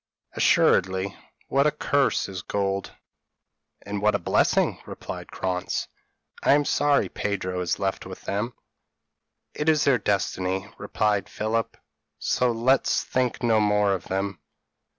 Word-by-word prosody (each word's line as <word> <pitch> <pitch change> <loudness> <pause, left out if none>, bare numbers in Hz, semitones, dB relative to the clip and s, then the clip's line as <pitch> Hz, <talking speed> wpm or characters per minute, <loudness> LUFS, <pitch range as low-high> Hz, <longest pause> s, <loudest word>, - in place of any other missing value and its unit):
p> - - -16
"Assuredly: 95 +1 +3 0.3
what 140 +2 +3
a - - +3
curse 140 -2 +1
is 95 -2 -6
gold!" 100 0 -2 0.9
"And 100 0 -4
what 105 0 +3
a - - +4
blessing!" - - +1
replied - - -7
Krantz. 90 -1 -2 0.5
"I - - +5
am 145 0 +3
sorry 145 0 +2
Pedro 95 -3 -3
is 90 - -1
left - - -2
with - - -9
them." 105 +5 -2 1.0
"It 150 +1 0
is 155 -1 +3
their 135 -4 +3
destiny," 95 -1 -1
replied 105 -1 0
Philip; 110 +1 -2 0.4
"so 125 -1 +1
let's 125 +4 +2
think 125 -1 -1
no 115 -2 +4
more 105 -1 +3
of 95 -1 -4
them. 95 0 -2
105 Hz, 135 wpm, -25 LUFS, 95-125 Hz, 1.0 s, I